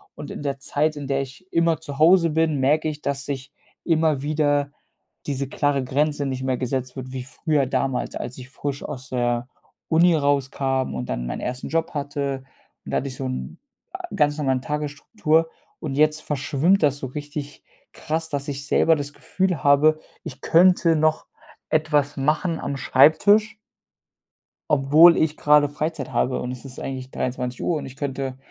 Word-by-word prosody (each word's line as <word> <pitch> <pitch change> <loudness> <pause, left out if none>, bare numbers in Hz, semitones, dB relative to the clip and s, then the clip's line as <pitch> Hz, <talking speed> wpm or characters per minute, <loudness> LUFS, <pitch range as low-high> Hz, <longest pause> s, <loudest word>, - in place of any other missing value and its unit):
Und 145 - -8
in - - -7
der 140 -1 -2
Zeit, 150 +3 0
in 145 -1 -6
der 135 0 0
ich 135 +7 -9
immer 165 -2 +2
zu 145 -3 -8
Hause 170 +1 +5
bin, 160 -2 +1
merke 150 +4 +2
ich, 150 -1 -5
dass 140 0 -3
ich 135 0 -5 0.3
immer 160 -4 +1
wieder 145 -1 +1 0.6
diese 140 -1 -2
klare 140 -1 0
Grenze 145 +3 0
nicht 130 -1 -3
mehr 130 -1 -1
gesetzt 130 0 -3
wird, 130 -1 -7
wie 130 -1 -4
früher 140 +1 -1
damals, 130 0 -1
als 125 - -6
ich 125 +1 -10
frisch 140 0 -5
aus 130 0 -7
der 120 -1 -1 0.4
Uni 170 +1 +4
rauskam 135 -2 0
und 65 -1 -5
dann - - -3
meinen - - -4
ersten 125 +1 -4
Job 165 0 -1
hatte. 140 -2 -2 0.5
Und - - -10
da - - +1
hatte 140 - -2
ich 130 - -6
so 135 - -5
'n 130 0 -5 0.3
ä 375 -2 -7
ganz 145 0 +2
normalen 135 -3 0
Tagesstruktur 150 +3 0 0.3
und 145 -4 -4
jetzt 155 +2 +2
verschwimmt 150 +6 +1
das 145 -2 +2
so 140 - -5
richtig 145 +2 -7 0.3
krass, 160 +1 -3
dass 140 -1 -3
ich 140 -1 -5
selber 165 +2 +3
das 145 -1 -5
Gefühl 185 -2 -2
habe, 150 +2 +5 0.2
ich 135 -4 -9
könnte 175 -1 +4
noch 155 0 +1 0.4
etwas 150 -2 +1
machen 155 +4 0
am 140 -1 -3
Schreibtisch 205 +12 +4 1.2
obwohl 150 +5 +7
ich 155 -1 +1
gerade 150 -1 +4
Freizeit 150 -1 -4
habe 130 - 0
und 125 - -4
es 125 +1 -9
ist 130 -1 -9
eigentlich 130 -1 -6
23:00 125 +5 -2
und 150 - -6
ich 130 - -10
könnte, 135 -2 -4
145 Hz, 175 wpm, -23 LUFS, 135-155 Hz, 1.2 s, obwohl